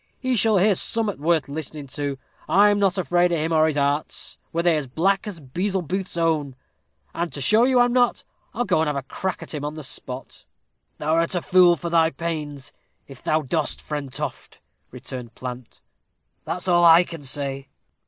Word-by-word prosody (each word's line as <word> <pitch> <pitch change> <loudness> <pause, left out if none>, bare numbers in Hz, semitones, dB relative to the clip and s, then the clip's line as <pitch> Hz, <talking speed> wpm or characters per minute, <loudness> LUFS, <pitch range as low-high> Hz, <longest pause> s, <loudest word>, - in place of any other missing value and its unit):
he 255 -1 0
shall 220 -1 +3
hear 200 +3 +4
summat 215 +1 0
worth 160 0 +1
listening 150 0 -6
to. 140 0 -4 0.3
I'm 205 +1 +5
not 195 -2 +2
afraid 175 +1 +2
o' - - +2
him 160 +1 -1
or 155 0 +4
his 150 -2 -1
arts, 145 +1 -1
were 170 +1 -1
they 170 -2 +4
as 150 -3 -2
black 190 - 0
as 195 -5 -6
Beelzebuth's 185 +5 -3
own; 155 -5 0 0.6
and 170 0 -3
to - - -6
show 215 - +4
you 255 -1 +3
I'm 245 0 +3
not, 245 -1 +2 0.3
I'll 245 - -2
go - - +2
and 160 - +1
have 150 - -1
a 140 - -3
crack 185 +7 -4
with - - -8
him 150 -2 -4
on 150 +1 -4
the 155 - -7
spot." 130 0 -5 0.5
"Thou'rt 165 +4 0
a 175 - 0
fool 180 -1 +5
for 170 0 -5
thy 165 -1 +4
pains, 150 -5 -5 0.3
if 135 -3 -13
thou 155 0 +1
dost, 150 +3 -1
Friend 145 -3 -5
Toft," - - -6 0.3
returned 125 -2 -8
Plant, 125 -1 -8 0.6
"that's 180 +1 -3
all 175 -1 +4
I 170 +1 +8
can 165 -3 -9
say." 135 0 -3
165 Hz, 190 wpm, -23 LUFS, 145-185 Hz, 0.6 s, I